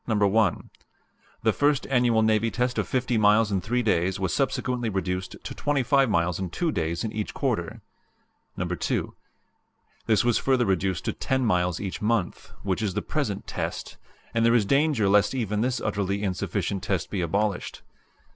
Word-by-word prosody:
The 105 -3 -1
first 145 -2 +2
annual 120 -4 +2
navy 110 +1 +2
test 125 +1 -1
of - - -1
50 125 -3 0
miles 105 +1 +4
in 95 -2 0
three 120 +6 0
days 95 -3 +1
was 95 -2 -1
subsequently 125 -3 -1
reduced 95 -1 -3
to - - -6
25 140 -2 +2
miles 85 -2 +1
in 95 -2 -3
two 165 - -1
days 85 -3 -2
in 110 - -3
each 105 -1 -4
quarter. - - -2 0.8
"2. - - -2 0.9
This 110 0 +3
was 120 -1 +2
further 130 -2 +2
reduced 95 -2 0
to - - -1
10 130 -1 -1
miles 90 -5 +1
each 95 -3 -5
month, 105 -4 -1
which 95 +1 -1
is 100 -4 -2
the - - -1
present - - -2
'test,' - - -5 0.4
and 115 - +1
there 115 +1 +4
is 110 -4 +3
danger 140 -3 +2
lest 105 +5 +3
even 105 -4 -1
this 125 +1 0
utterly 100 -1 -2
insufficient 95 0 -2
test 95 -3 -2
be 100 - -1
abolished. 100 +3 -2
105 Hz, 165 wpm, -26 LUFS, 95-120 Hz, 0.9 s, miles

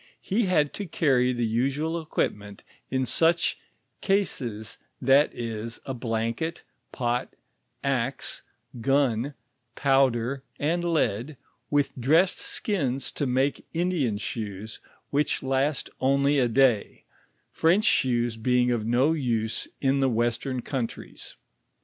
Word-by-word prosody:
He 205 +2 +1
had 150 -6 +2
to 205 - -5
carry 130 -6 +2
the 120 -1 -1
usual 140 +9 0
equipment 105 -9 -3 0.3
in 130 0 0
such 165 +7 +2 0.4
eaees, 125 - -1 0.2
that 135 +3 +4
ip, 115 -1 -4
a 135 - -3
blanket, 115 +6 -2 0.3
pot, 120 -1 -1 0.5
axe, 135 -1 -1 0.4
gun, 135 0 +1 0.4
powder, 135 -1 +2 0.2
and 170 +4 0
lead, 145 -5 0 0.3
with 145 -1 +1
dressed 160 +9 +3
skins 140 - -1
to 145 - -2
make 130 +3 0
Indian 165 - 0
shoes, 105 -1 -5 0.3
which 145 0 +1
last 135 +2 0
only 140 +2 +3
a 125 - +3
day, 120 -3 +2 0.5
French 175 +6 +3
shoes 120 -3 +2
being 125 +2 +2
of 115 -2 -1
no 130 +7 +3
use 115 -7 -1
in 135 0 +2
the 135 -1 +3
western 120 +2 -1
countries. 125 -5 -5
130 Hz, 115 wpm, -26 LUFS, 120-145 Hz, 0.5 s, that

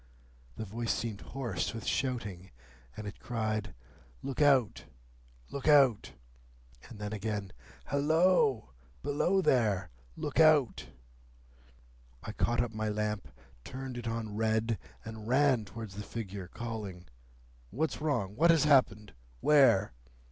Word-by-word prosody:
The 110 - -4
voice 115 +3 -3
seemed 110 -3 -3
hoarse 115 -7 -3
with 115 - -6
shouting, 105 -9 -2 0.5
and 105 - -6
it 100 - -8
cried, 110 - -3 0.5
'Look 135 +2 -3
out! 135 -8 +3 0.7
Look 140 - -5
out!' 135 -7 +5 0.8
And 115 - -10
then 105 0 -5
again, 105 -2 -3 0.3
'Halloa! 145 -4 +3 0.4
Below 175 +7 +1
there! 105 - +2 0.2
Look 145 - -3
out!' 155 -6 +4 1.4
I - - -5
caught 120 +2 +1
up 115 -2 -5
my 110 0 -2
lamp, 105 0 -2 0.4
turned 130 -1 -7
it 120 -1 -6
on 115 -2 -3
red, 110 0 0 0.3
and 110 -1 -8
ran 130 -3 +3
towards 110 0 -8
the 100 - -6
figure, 100 -4 -6
calling, 105 -5 -6 0.6
'What's 155 +6 -2
wrong? 115 -11 -1
What 165 +8 +4
has 165 -2 +5
happened? 130 -8 +3 0.3
Where? 135 - +4
115 Hz, 125 wpm, -31 LUFS, 105-135 Hz, 1.4 s, out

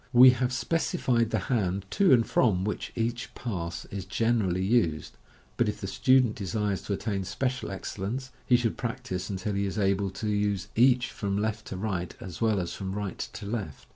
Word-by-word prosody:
We 125 +1 +10
have 125 0 0
speci 165 +7 -1
fied 115 -3 +2
the 110 - +1
hand 100 -3 -1
to 195 -2 +4
and 115 -3 +6
from 95 -6 +2
which 105 - -3
each 115 +1 -2
pass 85 -8 -4
is 100 -2 -4
generally 95 -2 +1
used 95 -8 +1
5 - - -29 0.4
but - - +2
if - - -4
the - - -5
student 130 -4 +3
de 100 -4 -4
sires 105 -2 -1
to 100 - 0
attain 100 -1 -2
special 125 +7 -2
excel 95 0 -5
lence, 130 +5 -4
he 125 - +4
should 120 -2 +1
practise 120 -7 -3
until 100 +1 -2
he 100 0 0
is 95 - -4
able 100 -1 +1
to 95 +3 -5
use 105 -1 0
each 125 +1 +4
from 100 -1 -2
left 110 +1 -1
to 95 - -5
right, 95 -3 -3
as 90 +1 -8
well 110 -3 +3
as 85 -2 -3
from 95 -1 -4
right 100 -1 -4
to 105 - -7
left. 100 - -5
105 Hz, 205 wpm, -28 LUFS, 95-120 Hz, 0.4 s, We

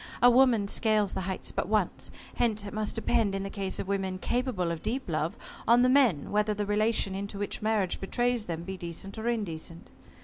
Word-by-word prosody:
A 245 +1 +7
woman 240 -5 +4
scales 215 -1 +2
the - - -2
heights 190 0 -3
but - - -2
once. 210 -3 0 0.3
Hence 215 -3 +1
it 200 - -7
must 215 0 -2
depend, 225 -3 +1
in 195 - -2
the 195 - -5
case 195 -2 -3
of - - -4
women 195 -1 -1
capable 220 -5 -1
of 165 -2 -4
deep 260 +4 -2
love 155 -1 -1 0.3
on 240 +2 +6
the 250 - +4
men 255 - +3
whether 210 0 +1
the 205 0 -2
relation 210 -1 +1
into 200 +1 -5
which 205 0 -3
marriage 215 -4 0
betrays 240 +3 0
them 165 -1 -4
be 190 +1 -6
decent 180 +4 -6
or 225 - -3
indecent. 170 -7 -4
205 Hz, 205 wpm, -29 LUFS, 190-230 Hz, 0.3 s, A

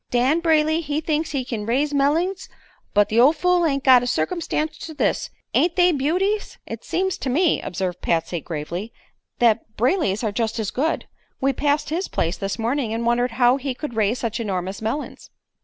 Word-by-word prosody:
Dan 255 +6 +2
Brayley 315 -1 +2
he 295 -1 -2
thinks 310 0 -1
he 270 -4 -2
kin 220 -4 -4
raise 280 +5 +1
mellings, 325 +7 +1 0.5
but 205 0 +4
the 225 - +2
ol' 270 +6 +7
fool 350 +2 +2
ain't 275 -2 -1
got 255 -2 +7
a 245 - -3
circumstance 310 +2 -1
to 315 - -8
this. - - 0 0.2
Ain't 340 0 +2
they 360 -1 +5
beauties?" 360 +9 0
"It - - -7
seems 380 0 -1
to 265 - -3
me," 325 +6 +2
observed 180 -1 -4
Patsy, 165 0 -1
gravely, 170 +8 -5 0.5
"that 225 -2 +1
Brayley's 245 - +1
are 215 - 0
just 225 +2 -1
as 215 -3 -2
good. 315 +6 -1 0.3
We 270 +1 +1
passed 290 +3 0
his 355 +4 -1
place 165 +2 -1
this 195 +1 -3
morning 230 0 -1
and 230 +1 -2
wondered 240 0 +1
how 245 +1 +4
he 270 -2 -4
could 295 -1 -6
raise 220 +2 +1
such 230 -1 -3
enormous 190 -3 -3
melons." 225 +7 -4
260 Hz, 190 wpm, -22 LUFS, 225-315 Hz, 0.5 s, ol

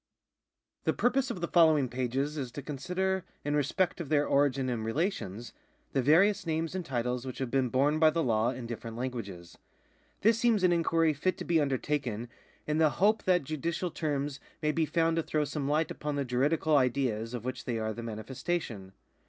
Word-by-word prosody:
The - - +2
purpose 260 +2 +1
of 180 - -5
the 170 - -1
following 160 -6 +5
pages 130 +4 -2
is 135 -5 -4
to 145 - -6
consider, 185 +7 -2 0.2
in 145 0 0
respect 170 +6 0
of 150 - -6
their 145 -1 +3
origin 140 -2 +2
and 120 -3 -2
relations, 120 - -2 0.4
the 135 - +2
various 175 +9 +4
names 160 +1 -1
and 185 -1 -3
titles 125 -3 -2
which 130 -2 -6
have 130 -3 -3
been 130 -2 +2
borne 140 +5 +2
by 160 -1 +6
the 165 +1 0
law 115 -1 +2
in 125 -1 -5
different 115 -1 -6
languages. 100 -9 -6 0.6
This 225 +2 +4
seems 230 -5 +3
an 180 - +5
inquiry 165 -2 +2
fit 180 +6 -1
to - - -6
be 165 -2 +3
under 135 -2 +1
taken 120 -6 -3 0.4
in 150 +1 0
the 160 -1 +5
hope 210 +3 +3
that 180 -4 +3
judicial 160 +5 -3
terms 145 -3 -2 0.2
may 150 -1 +1
be 160 0 0
found 165 +1 +1
to - - +3
throw 155 -1 0
some 145 -1 -3
light 155 +1 +1
upon 150 -1 -3
the 140 -1 -1
juridical 145 +5 +1
ideas 125 -4 +1
of 120 -1 -6
which 130 - -4
they 120 -2 -1
are 110 0 -2
the 115 - -7
manifestation. 115 - -4
145 Hz, 195 wpm, -30 LUFS, 125-165 Hz, 0.6 s, by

